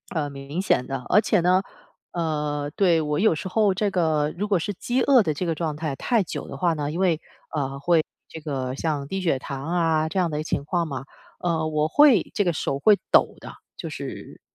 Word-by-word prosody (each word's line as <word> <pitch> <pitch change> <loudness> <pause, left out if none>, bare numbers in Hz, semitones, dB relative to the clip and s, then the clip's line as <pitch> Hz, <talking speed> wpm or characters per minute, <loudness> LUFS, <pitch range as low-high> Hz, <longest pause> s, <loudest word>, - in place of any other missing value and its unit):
呃， 145 -2 -1
明 140 +5 -5
显 125 -9 +1
的。 135 -2 -4
而 - - +6
且 210 -3 +2
呢， 180 +2 +3 0.5
呃 150 -3 -2
对， 175 -6 +4
我 150 0 -1
有 215 -5 +4
时 170 +5 -5
候 205 -1 +3
这 200 +1 0
个 155 -4 +1
如 205 - -1
果 195 -4 +2
是 205 +5 -3
饥 245 +7 -1
饿 260 -6 +5
的 155 - 0
这 175 +5 -3
个 165 - -1
状 155 -1 -2
态 155 -2 -3
太 230 - +1
久 - - -6
的 - - -7
话 175 -2 +1
呢， 145 -2 -3
因 165 - -4
为， 170 -4 +2 0.3
呃， 140 -2 -2
会 160 +1 +3 0.2
这 160 - -9
个 135 -4 -3
像 145 -2 -2
低 190 +3 -3
血 160 -7 +1
糖 135 +1 -6
啊 160 -2 +1
这 190 - -1
样 175 -2 +1
的 150 - -3
一 - - -1
个 - - -4
情 145 - -2
况 170 0 0
嘛， 135 -2 -5 0.3
呃， 165 -2 0
我 155 0 +1
会 275 - +5
这 205 - +2
个 175 - +1
手 140 -2 -2
会 210 +6 +5
抖 - - +4
的， - - -10 0.2
就 - - -5
是。 - - -8
160 Hz, 245 characters per minute, -24 LUFS, 150-185 Hz, 0.5 s, 而